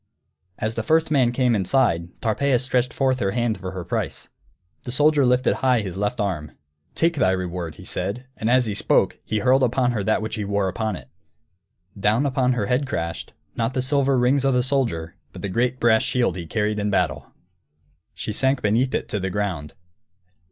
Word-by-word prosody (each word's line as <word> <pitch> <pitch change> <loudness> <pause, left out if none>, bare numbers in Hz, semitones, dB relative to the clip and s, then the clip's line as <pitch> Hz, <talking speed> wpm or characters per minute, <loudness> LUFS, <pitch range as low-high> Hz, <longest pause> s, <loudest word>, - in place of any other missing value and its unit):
As 110 +1 -2
the 115 - -2
first 160 +6 +2
man 130 -5 +3
came 125 -1 +2
inside, 95 -4 +1
Tarpeia 125 +4 +2
stretched 125 0 0
forth 130 -1 +1
her 95 -3 0
hand 120 -3 0
for 95 -1 -5
her 90 -1 -6
price. - - -3 0.5
The 120 - -6
soldier 150 +2 +3
lifted 125 0 +2
high 130 -3 +2
his 95 -3 -5
left 105 +1 -2
arm. 80 -8 -2 0.4
"Take 165 -1 +1
thy 95 - +3
reward!" 90 -3 -3
he - - -12
said, 120 +6 -3
and 110 - -2
as 125 0 +4
he 105 - -2
spoke - - +1
he 110 - -2
hurled 130 +4 +3
upon 125 0 +2
her 110 -4 -2
that 110 +1 +1
which 110 - -4
he 105 - -2
wore 100 -1 0
upon 110 +3 -2
it. - - -11 0.9
Down 110 +7 +2
upon 130 -2 +1
her 115 -5 -1
head 125 +6 0
crashed 85 -8 -4 0.2
not 115 +2 -1
the 130 - +1
silver 135 0 +2
rings 130 +3 +3
of 135 -1 +2
the 125 - +3
soldier, 120 -12 -1 0.2
but - - -10
the 100 - -2
great 120 +5 0
brass 110 -1 +4
shield 120 -8 0
he 85 -3 -6
carried 105 +2 -1
in 105 0 -1
battle! 75 -8 0 0.9
She - - -4
sank 130 +4 +1
beneath 115 +5 +2
it, - - -2
to 105 - -2
the 95 0 -2
ground. 90 -7 -3
115 Hz, 200 wpm, -23 LUFS, 100-130 Hz, 0.9 s, as